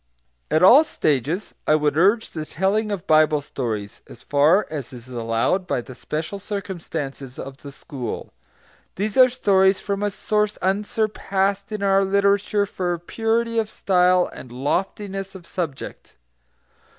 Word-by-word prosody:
At 155 +3 +2
all 255 +11 +9
stages 155 - -1
I 155 - +5
would 150 -1 +1
urge 200 +8 +3
the 155 - -4
telling 195 +7 0
of 195 -3 -4
Bible 155 -2 +4
stories, 110 -8 -5
as 120 - -14
far 155 +8 +3
as 145 -6 -5
is 125 -1 -11
allowed 115 +10 0
by - - 0
the 130 - -11
special 155 +9 -5
circumstances 165 - -5
of 135 0 -7
the 140 - -10
school. 130 -3 -7 0.6
These 205 +2 -2
are 255 -1 +7
stories 190 -6 +3
from 200 0 -3
a 205 - +1
source 210 +1 -1
unsurpassed 200 0 -1
in 210 -2 -3
our 195 0 +4
literature 200 +1 +2
for 180 -3 -2
purity 230 +6 -1
of 220 -1 -1
style 180 -3 +3
and 125 - -11
loftiness 195 - -3
of 180 -3 -11
subject. 165 -8 -6
190 Hz, 145 wpm, -22 LUFS, 150-205 Hz, 0.6 s, all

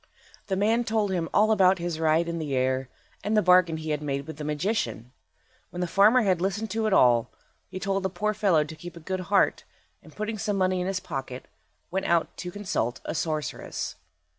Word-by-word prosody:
The 195 - 0
man 220 +5 +2
told 220 -3 0
him 170 -3 -1
all 215 +2 +4
about 190 -3 +5
his 170 -2 -3
ride 160 +1 +2
in 170 0 -3
the 145 -4 -2
air, 130 0 0 0.3
and 215 +1 +1
the 210 - +4
bargain 180 -2 +5
he 155 0 -4
had 150 0 -1
made 140 -2 -3
with 160 -1 -8
the 150 - -6
magician. 145 - -2 0.6
When 175 - -8
the 180 - 0
farmer 210 +7 +5
had 185 -4 +1
listened 200 +3 -2
to 220 +1 0
it - - 0
all, 120 -8 +4 0.4
he 185 - -7
told 195 0 -1
the 190 - -1
poor 210 +4 -1
fellow 195 -7 +3
to 155 +1 -9
keep 175 +2 -10
a - - -9
good 185 +3 -3
heart, 200 -1 +3 0.4
and - - -17
putting 215 0 -3
some 205 -1 -1
money 185 -1 +1
in 180 - -2
his 190 -1 -1
pocket, 135 -5 -6 0.4
went 190 +1 -1
out 170 -1 +1
to 180 - -5
consult 175 - -2
a - - -3
sorceress. 155 -2 -3
180 Hz, 215 wpm, -26 LUFS, 155-200 Hz, 0.6 s, about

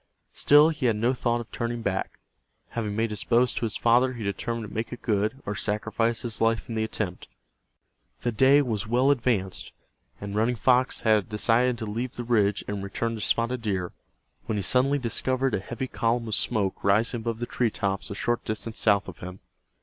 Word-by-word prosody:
Still 150 +2 +6
he 150 -5 -1
had 115 - +2
no 115 +4 +1
thought 120 -1 0
of 115 - -12
turning 115 0 -3
back. 95 -2 -2 0.5
Having 105 -3 -3
made 110 0 0
his 105 - -3
boast 120 0 +2
to - - 0
his 105 - -1
father 125 +2 +3
he 115 -3 -6
determined 115 +3 -3
to - - -12
make 110 +2 -3
it 125 - -8
good, 110 +4 0
or 105 - -2
sacrifice 110 +3 -1
his 115 -3 -4
life 115 0 +1
in 115 - -5
the 110 0 0
attempt. 105 -4 -4 0.9
The 120 - 0
day 135 +6 +5
was 110 -4 -2
well 125 +5 +3
advanced, 115 -8 -1 0.5
and 100 0 -6
Running 115 +3 +2
Fox 125 +3 +2
had 110 -1 +4
about 100 - -4
decided 120 +3 +2
to 115 - -4
leave 115 +4 -4
the 120 - -4
ridge 105 -4 +1
and 100 -1 -4
return 115 +4 -2
to 110 - -5
Spotted 115 +3 0
Deer, 95 -5 -2 0.6
when 110 - -1
he 100 - -2
suddenly 130 +7 +3
discovered 130 +1 0
a - - +1
heavy 120 +6 -5
column 115 -1 -1
of 110 - -3
smoke 100 -2 0
rising 110 +5 +2
above 115 0 -3
the 120 - -3
tree 120 0 0
tops 100 -2 -2
a 100 - -5
short 120 +3 -1
distance 110 +1 -3
south 100 -2 +3
of 90 -5 -9
him. 90 +1 -8
115 Hz, 205 wpm, -26 LUFS, 105-120 Hz, 0.9 s, Still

